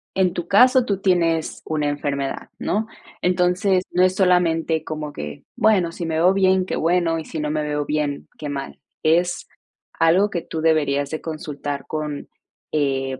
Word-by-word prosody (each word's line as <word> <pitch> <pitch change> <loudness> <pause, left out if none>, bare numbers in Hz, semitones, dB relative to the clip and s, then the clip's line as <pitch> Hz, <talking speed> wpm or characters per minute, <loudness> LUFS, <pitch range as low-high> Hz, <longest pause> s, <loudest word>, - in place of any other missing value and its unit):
En 185 -2 +2
tu 175 -1 -4
caso 250 +5 +5
tú 200 -4 -1
tienes 170 -4 +1
una 150 -2 -1
enfermedad, 140 -1 -3
¿no? 215 +3 -1 0.4
Entonces, 180 +1 +2
no 180 +1 +3
es 185 0 +3
solamente 170 -4 +2
como 155 -1 -5
que: 75 -1 -7
"Bueno, 190 -6 +3
si 170 - -5
me 160 -1 -2
veo 175 +4 +4
bien, 190 -1 +3
qué - - -3
bueno, 165 0 +1
y 160 - -7
si 160 - -6
no 150 0 -2
me 155 0 -1
veo 150 -1 -2
bien, 150 -2 -2
qué 150 - -6
mal". 140 -1 -5 0.2
Es 175 +3 +1 0.5
algo 185 +6 +4
que 175 - -3
tú 160 - -5
deberías 145 -3 +2
de 155 - -4
consultar 150 -3 -5
con, 150 -2 -4 0.4
eh, 135 -3 0
165 Hz, 175 wpm, -22 LUFS, 150-180 Hz, 0.5 s, caso